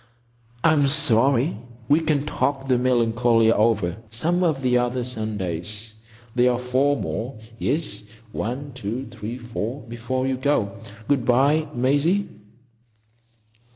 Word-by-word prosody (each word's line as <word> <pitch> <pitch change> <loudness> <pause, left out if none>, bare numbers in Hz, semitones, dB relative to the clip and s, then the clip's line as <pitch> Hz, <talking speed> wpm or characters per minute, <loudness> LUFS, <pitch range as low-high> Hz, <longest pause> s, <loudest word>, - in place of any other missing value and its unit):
"I'm 155 -3 +4
sorry. 135 -1 +3 0.3
We'll 155 +3 +3 0.2
talk 140 -2 -1
the 130 -2 +3
Melancolia 120 -2 +3
over 105 -6 +2
some 165 +11 0
one 175 - +4
of 135 -4 -3
the 125 -1 +2
other 125 +1 -1
Sundays. 105 -2 -4 0.4
There 125 0 +4
are - - -1
four 130 +3 +1
more—yes, 115 +1 -3 0.3
one, 130 +7 -4
two, 120 +1 -4
three, 115 +1 -6
four—before 120 +1 -4
you 130 -1 0
go. 130 -7 0 0.3
Good 140 -4 +2
bye, 140 +6 +3
Maisie." 145 +11 +2
125 Hz, 115 wpm, -23 LUFS, 115-140 Hz, 0.4 s, I'm